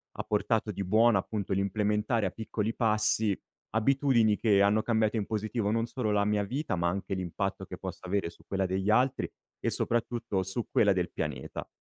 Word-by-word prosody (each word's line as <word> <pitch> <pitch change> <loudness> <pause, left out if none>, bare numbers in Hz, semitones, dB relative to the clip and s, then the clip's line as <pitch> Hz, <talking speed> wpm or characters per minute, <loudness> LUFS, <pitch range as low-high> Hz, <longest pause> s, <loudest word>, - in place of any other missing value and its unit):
ha - - -3
portato 110 +1 0
di 100 0 -4
buono, 110 +2 +4
appunto, 100 -1 -3
l'implementare 105 +3 +1
a 95 - -1
piccoli 110 +1 -3
passi, 105 -2 +2 0.3
abitudini 115 -2 +3
che 100 -3 +4
hanno 105 +2 +3
cambiato 110 -1 +1
in 105 - -2
positivo 110 0 -1
non 115 +1 +1
solo 120 -2 -3
la 100 -1 +2
mia 105 0 +1
vita, 125 +1 -2
ma 85 0 0
anche 95 +2 -3
l'impatto 95 +1 -3
che - - -8
possa - - -7
avere 95 -2 -1
su - - -20
quella 95 -1 0
degli 95 +2 -1
altri 125 +4 +2 0.3
e - - 0
soprattutto 120 -4 -1
su 95 +5 -3
quella 105 - +4
del 90 -2 0
pianeta. 75 -5 -4
105 Hz, 185 wpm, -29 LUFS, 100-115 Hz, 0.3 s, buono